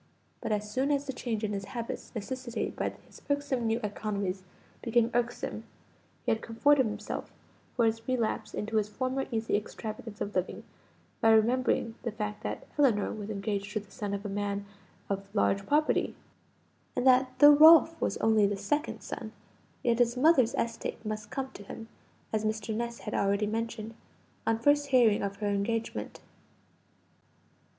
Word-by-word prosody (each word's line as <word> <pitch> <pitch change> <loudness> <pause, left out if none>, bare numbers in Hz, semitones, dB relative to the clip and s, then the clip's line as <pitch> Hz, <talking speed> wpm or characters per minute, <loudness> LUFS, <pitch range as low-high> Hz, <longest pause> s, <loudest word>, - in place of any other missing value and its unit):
But - - -3
as 210 0 0
soon 265 +4 0
as 285 -1 +1
the 270 - -4
change 230 -3 -3
in 210 -1 -1
his 195 0 -3
habits, 230 +3 -6
necessitated 245 +2 -4
by - - -1
his 285 0 -4
new 230 -3 +1
economies, 200 -2 -2 0.4
became 235 0 +2
irksome, 240 0 -2 0.6
he - - +2
had 220 - 0
comforted 260 +3 +3
himself 210 0 -5 0.4
for 235 - +3
his 225 0 -1
relapse 250 -4 -1
into 220 +1 -2
his 210 -1 +1
former 255 +4 -2
easy 225 -2 0
extravagance 215 0 -5
of 205 - -3
living 185 0 -2 0.6
by 225 - +5
remembering 230 +1 +3
the 235 - -3
fact 210 -1 -4
that - - -4
Ellinor 235 -8 +3
was 210 -1 -6
engaged 200 0 -3
to 215 - 0
the 200 -1 -16
son 205 -4 -3
of 200 +1 -7
a - - -1
man 200 0 -2 0.4
of 195 0 -3
large 200 -1 +2
property: 300 +1 +2 0.8
and 245 - 0
that 255 0 +4
though 290 0 +9
Ralph 320 +2 +8
was - - 0
only 220 -2 +4
the 200 0 -2
second 295 +11 -1
son, - - -6 0.5
yet 235 -1 +2
his 240 0 +3
mother's 260 -4 +4
estate 230 -1 -3
must 215 0 -4
come 265 +1 -4
to - - -11
him, 225 +3 -9 0.4
as 215 0 +1
Mr. 215 0 -2
Ness 235 +1 -3
had 210 - -5
already 200 +1 +1
mentioned, 225 +1 -3 0.5
on 225 0 +3
first 290 +4 +3
hearing 240 -6 +4
of 200 0 -2
her 205 0 -2
engagement. 220 +3 -2
225 Hz, 165 wpm, -30 LUFS, 210-250 Hz, 0.8 s, though